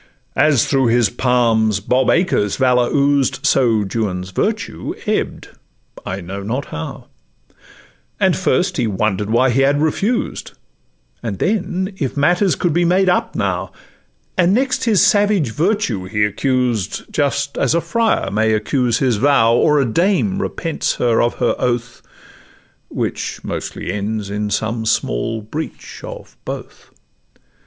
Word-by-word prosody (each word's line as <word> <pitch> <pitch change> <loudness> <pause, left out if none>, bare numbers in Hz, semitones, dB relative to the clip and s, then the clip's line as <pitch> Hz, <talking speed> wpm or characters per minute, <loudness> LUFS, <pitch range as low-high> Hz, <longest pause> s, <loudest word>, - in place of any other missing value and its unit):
As 140 -2 +3
through 135 -3 +2
his 115 -3 +3
palms 115 -4 +2
Bob 125 +5 +1
Acres' 170 - +2
valour 125 -2 +2
oozed, 140 -1 +1
So 115 -5 +3
Juan's 95 -3 -3
virtue - - -2
ebb'd, - - -2 0.5
I 95 +1 -5
know 95 +3 -6
not 120 +8 -3
how; 80 0 -6 1.1
And - - +3
first - - 0
he 115 - +1
wonder'd 105 0 -1
why 120 +3 +3
he 130 +3 +2
had 140 +1 +3
refused; 195 +10 -1 0.7
And 110 -5 -4
then, 190 - -1
if 135 -1 -2
matters 175 +4 +3
could 175 -4 0
be 175 +2 +2
made 185 +2 +3
up 180 - 0
now; - - -2 0.7
And 180 +2 +4
next 260 +1 0
his 210 -4 +4
savage 205 - +2
virtue 155 - 0
he 105 +2 +1
accused, 120 -2 -1
Just 140 -1 0
as - - +2
a - - +3
friar 230 +5 0
may 110 +1 +2
accuse 120 +2 +1
his 125 -5 +1
vow, 115 -2 +4
Or 150 +5 +3
as 135 - +2
a - - -2
dame 195 - +1
repents 165 -5 -2
her 120 -2 +2
of 120 - +1
her 120 - +1
oath, 120 0 -2 0.9
Which - - -4
mostly 90 - -4
ends 105 0 -3
in 105 0 -2
some 110 +2 -2
small 110 - -1
breach 150 +9 -7
of - - -10
both. - - -8
125 Hz, 145 wpm, -18 LUFS, 110-165 Hz, 1.1 s, And